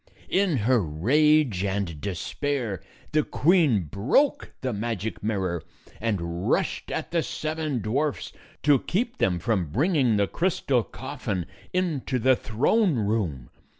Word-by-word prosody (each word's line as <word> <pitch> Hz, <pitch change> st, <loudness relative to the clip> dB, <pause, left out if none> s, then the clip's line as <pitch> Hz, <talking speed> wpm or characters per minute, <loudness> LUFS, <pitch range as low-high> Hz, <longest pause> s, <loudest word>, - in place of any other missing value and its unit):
In 190 Hz, -6 st, +2 dB
her 125 Hz, -2 st, +4 dB
rage 120 Hz, -, +3 dB
and 95 Hz, -6 st, -2 dB
despair, 110 Hz, -, -2 dB, 0.3 s
the 155 Hz, -, +3 dB
queen 150 Hz, -, +3 dB
broke 110 Hz, -, +1 dB
the 130 Hz, -2 st, -1 dB
magic 110 Hz, 0 st, -3 dB
mirror 95 Hz, -6 st, -1 dB, 0.4 s
and 90 Hz, -6 st, -2 dB
rushed -, -, 0 dB
at -, -, -4 dB
the 170 Hz, -1 st, +2 dB
seven 155 Hz, -5 st, -3 dB
dwarfs 140 Hz, +7 st, -1 dB, 0.3 s
to 145 Hz, -3 st, +5 dB
keep 235 Hz, -, -2 dB
them 90 Hz, -2 st, +2 dB
from 95 Hz, -4 st, 0 dB
bringing 130 Hz, -, +2 dB
the 100 Hz, -, +3 dB
crystal 140 Hz, -, +1 dB
coffin 125 Hz, -, -4 dB, 0.3 s
into 160 Hz, -8 st, -1 dB
the 130 Hz, +2 st, +4 dB
throne 150 Hz, -, +2 dB
room. 100 Hz, -, -1 dB
120 Hz, 125 wpm, -26 LUFS, 100-155 Hz, 0.4 s, to